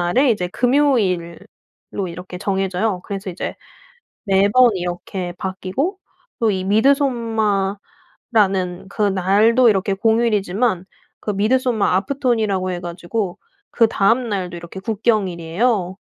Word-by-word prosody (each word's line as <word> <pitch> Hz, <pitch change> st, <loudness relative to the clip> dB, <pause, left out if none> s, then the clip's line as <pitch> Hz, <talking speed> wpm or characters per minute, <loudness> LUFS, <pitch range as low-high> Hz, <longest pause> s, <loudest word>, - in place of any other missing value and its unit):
그날에 245 Hz, +11 st, +3 dB
이제 185 Hz, -5 st, 0 dB
금요일로 200 Hz, -, -1 dB
이렇게 180 Hz, +1 st, -8 dB
정해져요. 195 Hz, 0 st, -1 dB
그래서 195 Hz, -1 st, -5 dB
이제 175 Hz, -, -5 dB, 0.7 s
매번 205 Hz, +5 st, +4 dB
이렇게 175 Hz, 0 st, -4 dB
바뀌고 190 Hz, -, -3 dB, 0.4 s
또 225 Hz, -3 st, +2 dB
이 190 Hz, -2 st, -2 dB
미드소마라는 220 Hz, -4 st, +1 dB, 0.9 s
그날도 205 Hz, +4 st, +3 dB
이렇게 195 Hz, -1 st, +1 dB
공휴일이지만 210 Hz, -2 st, +1 dB, 0.4 s
그 210 Hz, -, -2 dB
midsommar 220 Hz, 0 st, +1 dB
afton이라고 220 Hz, -9 st, 0 dB
해 175 Hz, -, -3 dB
가지고 175 Hz, +3 st, -4 dB, 0.3 s
그다음 230 Hz, +1 st, +2 dB
날도 185 Hz, -4 st, -3 dB
이렇게 170 Hz, +2 st, -8 dB
국경일이에요. 195 Hz, -2 st, 0 dB
200 Hz, 315 characters per minute, -20 LUFS, 185-230 Hz, 0.9 s, 매번